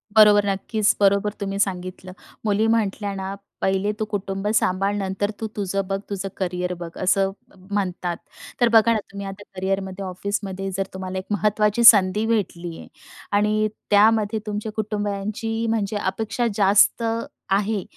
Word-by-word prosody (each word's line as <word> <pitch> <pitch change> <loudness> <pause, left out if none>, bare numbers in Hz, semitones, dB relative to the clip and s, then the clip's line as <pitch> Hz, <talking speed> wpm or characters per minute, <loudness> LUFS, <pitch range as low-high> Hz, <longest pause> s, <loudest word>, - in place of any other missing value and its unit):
बरोबर 210 -1 +7
नक्कीच 205 +2 +1
बरोबर 200 +1 +3
तुम्ही 195 0 -3
सांगितलं. 185 -1 -2 0.3
मुली 210 +1 +2
म्हटल्या 210 -2 0
ना 190 0 -4 0.3
"पहिले 190 +2 +1
तू 215 - 0
कुटुंब 195 -1 -3
सांभाळ 195 +1 +1
नंतर 200 +1 -2
तू 220 - -2
तुझं 195 -1 -2
बघ 195 0 -1
तुझं 195 -1 -3
करियर 180 -1 -2
बघ" 170 -1 -7
असं 195 +1 +3 0.2
म्ह 190 -1 -20
म्हणतात. 180 -3 -1 0.4
तर 240 - +6
बघा 225 +1 +6
ना 220 - +1
तुम्ही 200 0 -6
आता 195 +1 -8
करिअरमध्ये 190 0 -2
ऑफिसमध्ये 195 +1 -3
जर 195 0 -1
तुम्हाला 190 0 -5
एक 185 - -9
महत्त्वाची 210 +2 +2
संधी 210 -1 +7
भेटली 175 -7 -2
आहे - - -11 0.5
आणि 215 +1 +2 0.2
त्यामध्ये 215 +1 +4
तुमच्या 210 +1 -3
कुटुंबांची 215 +1 -2
म्हणजे 215 -2 -1
अपेक्षा 220 +5 -1
जास्त 205 +3 +4 0.5
आहे, 200 0 +1
200 Hz, 145 wpm, -23 LUFS, 190-210 Hz, 0.5 s, बरोबर